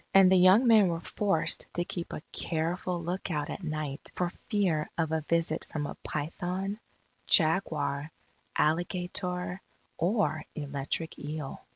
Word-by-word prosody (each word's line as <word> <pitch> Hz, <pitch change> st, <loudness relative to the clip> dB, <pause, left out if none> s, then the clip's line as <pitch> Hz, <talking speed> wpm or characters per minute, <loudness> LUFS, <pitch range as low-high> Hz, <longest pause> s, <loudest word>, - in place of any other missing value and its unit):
And 190 Hz, -1 st, +8 dB
the -, -, +7 dB
young 185 Hz, +7 st, +7 dB
men 220 Hz, -4 st, +7 dB
were 165 Hz, -1 st, -1 dB
forced 195 Hz, -1 st, 0 dB
to 175 Hz, -, 0 dB
keep 175 Hz, -1 st, -5 dB
a -, -, -6 dB
careful 170 Hz, +2 st, -2 dB
lookout 170 Hz, -4 st, -2 dB
at -, -, -5 dB
night 155 Hz, -4 st, -4 dB
for 175 Hz, -1 st, 0 dB, 0.2 s
fear 185 Hz, -8 st, +1 dB
of 160 Hz, -2 st, 0 dB
a 160 Hz, 0 st, +1 dB
visit 165 Hz, -1 st, +1 dB
from 150 Hz, -2 st, -2 dB
a -, -, -4 dB
python, 180 Hz, +7 st, -3 dB, 0.5 s
jaguar, 155 Hz, -3 st, +3 dB, 0.5 s
alligator, 180 Hz, +2 st, -1 dB, 0.4 s
or 175 Hz, -3 st, +1 dB
electric 145 Hz, +2 st, -3 dB
eel. 150 Hz, -1 st, -5 dB
170 Hz, 135 wpm, -30 LUFS, 155-185 Hz, 0.5 s, And